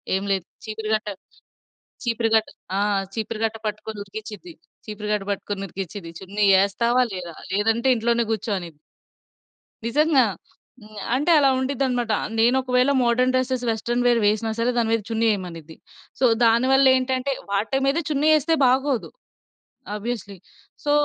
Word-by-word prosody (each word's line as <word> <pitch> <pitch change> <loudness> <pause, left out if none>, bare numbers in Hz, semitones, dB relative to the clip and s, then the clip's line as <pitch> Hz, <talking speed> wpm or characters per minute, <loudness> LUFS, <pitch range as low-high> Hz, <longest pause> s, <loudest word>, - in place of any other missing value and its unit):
ఏం 190 - -1
లేదు 190 -3 -2 0.2
చీపిరి 215 0 -5
గట్ట, 215 -1 -4 1.0
చీపిరి 230 -1 0
కట్ట 220 - +1 0.3
ఆ! - - +1 0.4
చీపిరి 220 0 -3
కట్ట 225 - -5
పట్టుకొని 215 0 -6
ఉరికిచ్చిద్ది. 220 - -9 0.3
చీపిరి 210 -1 -6
కట్ట 205 - -2
పట్టుకొని 200 0 -5
ఉరికిచిద్ది. 185 -1 -7
"చున్నీ 200 +2 -2 0.2
ఎస్తావా 235 +5 +1
లేదా? 175 -3 -7 0.2
లేదంటే 225 +5 +1
ఇంట్లోనే 235 +1 +1
గూర్చో" 220 0 -2
అని. 175 -2 -8 1.1
నిజంగా. 285 +2 +3 0.6
హ్మ్. 215 -1 -13 0.2
అంటే 290 +6 +1
అలా 275 -2 +4
ఉండిద్ది 270 +1 -1
అన్నమాట. 245 -3 -1 0.3
నేను 235 +3 +4
ఒకవేళ 255 +1 +2
మోడర్న్ 250 +2 +2
డ్రెసెస్, 255 -1 0
వెస్టర్న్ 235 +2 -1
వేర్ 240 -1 +4
వేసినా 215 +2 +1
సరే 235 +2 +2
దాని 230 -1 +1
మీద 230 -1 +1
చున్నీ 225 0 +1
ఎయమనిద్ది. 165 -5 -8 0.4
సో, - - +1 0.2
దానివల్లేంటంటే 260 +2 +3 0.2
వాటి 210 +7 0
మీద 275 +4 +2
చున్నీ 300 0 +1
ఎస్తే 320 +3 0
బాగోదు. 260 0 +1 0.9
Obviously, 210 -3 -5 0.5
so, 290 - 0
230 Hz, 140 wpm, -23 LUFS, 210-255 Hz, 1.1 s, అలా